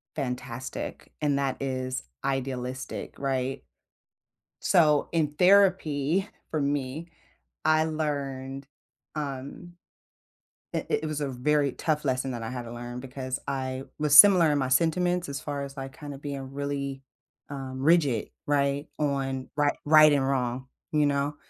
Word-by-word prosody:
fantastic, 125 -2 -5
and 145 -2 +2
that 135 -2 -1
is 130 -1 -2 0.2
idealistic, 130 -1 -3
right? 135 -1 -1 1.0
So, 150 -4 +4
in 155 -3 +1
therapy- 185 -3 +4 0.2
for 155 - -1
me- 140 +3 -2 0.6
I 155 0 +4
learned, 140 -4 -3 0.5
um 145 +3 -6 1.0
i - - -2
it - - +1
was 155 -1 -3
a 145 - -1
very 140 +2 +1
tough 150 -2 -1
lesson 130 -1 0
that 120 -2 -5
I 115 - -4
had 125 -1 -4
to 115 - -8
learn 120 +1 -6
because 130 0 -5
I 130 -1 -3
was 150 -1 +4
similar 175 -1 +9
in 145 - +2
my 130 -2 0
sentiments 175 +5 +2
as 140 -1 -4
far 145 0 -4
as, 140 0 -9
like, 135 0 -7
kinda 145 -3 -7
being 135 -2 -6
really, 140 -1 -3 0.5
um, 135 -2 -6
rigid, 145 -7 +3 0.2
right? 140 0 +1
On, 135 -3 -1
rig 145 -1 +3
right 155 0 +7
and 140 -2 +2
wrong, 130 -1 -1 0.2
you 150 -1 +3
know? 140 +1 0
140 Hz, 140 wpm, -27 LUFS, 130-150 Hz, 1.0 s, similar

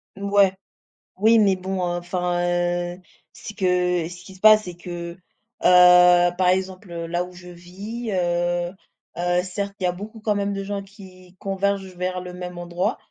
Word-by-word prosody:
Ouais. 200 -1 +3 0.6
Oui, 225 +3 +5
mais 200 -3 +4
bon, 190 +1 -4
heu, 175 0 -2
enfin, 175 0 -2 0.6
heu, 185 - -19 0.3
ce - - -9
que 180 -4 +1
ce 175 +1 -11
qui 190 - -13
se 185 - -17
passe, 215 0 +7
c'est 180 -3 -8
que 175 -1 -7
heu, 175 - -15 0.5
par 180 0 +6
exemple 185 0 -1
là 175 +1 -1
où 180 - -13
je 180 0 -12
vis 200 +7 -7
heu, 175 -1 0 0.5
heu, 175 +1 +1
certes 200 +2 -5
il - - -3
y - - +3
a - - +1
beaucoup 210 +5 -9
quand 215 -1 0
même 200 0 -1
de 195 - -4
gens 200 0 -4
qui 190 -2 -15
convergent 195 -1 -2
vers 180 0 -3
le 180 0 -8
même 180 0 -7
endroit, 175 +1 -2
180 Hz, 180 wpm, -23 LUFS, 175-195 Hz, 0.6 s, passe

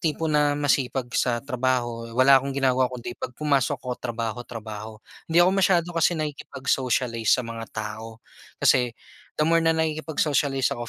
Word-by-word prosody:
tipo 160 0 -1
na 145 -1 +3
masipag 130 -3 0
sa 120 0 0
trabaho, 120 -3 -1
wala 135 +1 +6
akong 140 +1 -5
ginagawa 130 -1 +2
kundi 120 -1 -6
pag 125 - -6
pumasok 140 -5 +1
ako 125 -1 -5
trabaho-trabaho, 110 -2 -5 0.3
hindi 160 - -1
ako 185 - +4
masyado 185 -3 +2
kasi 165 +1 +2
nakikipag-socialize 130 -6 -2
sa 125 - -3
mga 115 -1 -7
tao. 110 +1 -6 0.4
Kasi, 120 -2 +2 0.4
the 150 - +2
more 165 +1 +3
na 165 0 +2
nakikipag-socialize 150 -4 0
ako, 120 0 -5
130 Hz, 150 wpm, -25 LUFS, 120-150 Hz, 0.4 s, wala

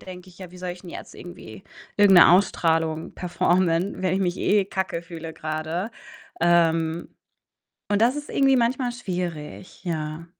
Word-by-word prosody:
denke 185 0 -11
ich: 175 - -18
„Ja, 185 -2 -9
wie 180 - -13
soll 180 0 -4
ich 180 - -9
denn 175 - -10
jetzt - - -9
irgendwie 110 - -11 0.3
irgend 200 -3 +7
'ne - - +8
Ausstrahlung 165 -4 +1
performen, 175 +1 0
wenn 185 -1 +1
ich 195 - 0
mich 175 -1 0
eh 205 -1 +2
kacke 190 -3 -3
fühle 165 -1 -8
grade?“ 155 +7 -4 0.5
Ähm, 165 -1 +2 0.8
und 205 +1 +1
das 245 +4 +3
ist 295 0 -6
irgendwie 270 -1 +3
manchmal 245 +1 +1
schwierig, 180 -8 -6
ja. 160 -2 -4
175 Hz, 160 wpm, -24 LUFS, 165-190 Hz, 0.8 s, ne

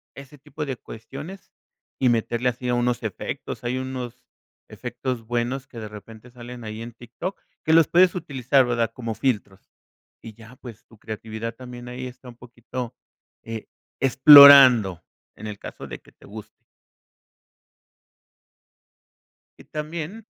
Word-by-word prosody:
ese 140 +1 -12
tipo 145 +3 -7
de 135 -3 -5
cuestiones 145 - -10 0.5
y 130 - +2
meterle 120 +1 0
así 125 +1 -5
a 125 - +1
unos 120 0 -1
efectos. - - -6
Hay 125 +2 -1
unos 125 -2 -6 0.4
efectos 125 -1 -5
buenos 120 +3 -2
que 115 - -11
de 110 -1 -7
repente 110 +3 -13
salen 120 0 -10
ahí 110 0 -7
en 115 0 -8
Tik 120 0 -16
Tok 185 +2 -4 0.3
que 160 - +3
los 165 -2 +6
puedes 180 +1 +4
utilizar, 135 -4 +1
¿verdad? 115 -2 -1
Como 115 -3 -5
filtros, 100 -7 -3 0.5
y 110 - -10
ya 115 +3 -15
pues 120 -5 -12
tu 115 - -20
creatividad 110 +1 -6
también 125 -1 -10
ahí 125 +1 -6
está 125 0 -12
un 120 - -14
poquito, 125 0 -8 0.5
eh, 115 -1 -7 0.3
explorando 130 - +8 0.3
en 110 - -9
el 105 -1 -7
caso - - -9
de - - -8
que - - -21
te - - -21
guste. 105 +1 -12 2.9
Y - - -16
también 160 +7 -6
125 Hz, 145 wpm, -23 LUFS, 115-135 Hz, 2.9 s, explorando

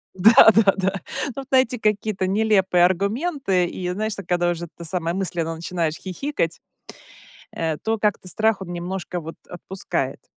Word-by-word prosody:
Да, 220 +5 +8
да, 205 -3 +5
да. 195 0 -1 0.3
Ну - - -7
вот 270 -1 -6
найти 260 -2 +3
какие-то 210 -3 0
нелепые 190 -3 +3
аргументы 200 - 0
и, 180 +1 -4
знаешь, 215 +4 -2
так 200 -4 -9
когда 175 0 +1
уже, 170 0 -4
это 170 0 -12
самое, 170 0 -2
мысленно 170 -4 -2
начинаешь 165 -1 -2
хихикать, 185 - -3 0.9
э, 160 -2 -2
то 220 +5 -2
как-то 210 -3 0
страх 215 +3 +1
он 175 -2 -6
немножко 180 +1 -4
вот 165 0 -8
отпускает. 190 +2 -4
190 Hz, 155 wpm, -22 LUFS, 175-215 Hz, 0.9 s, Да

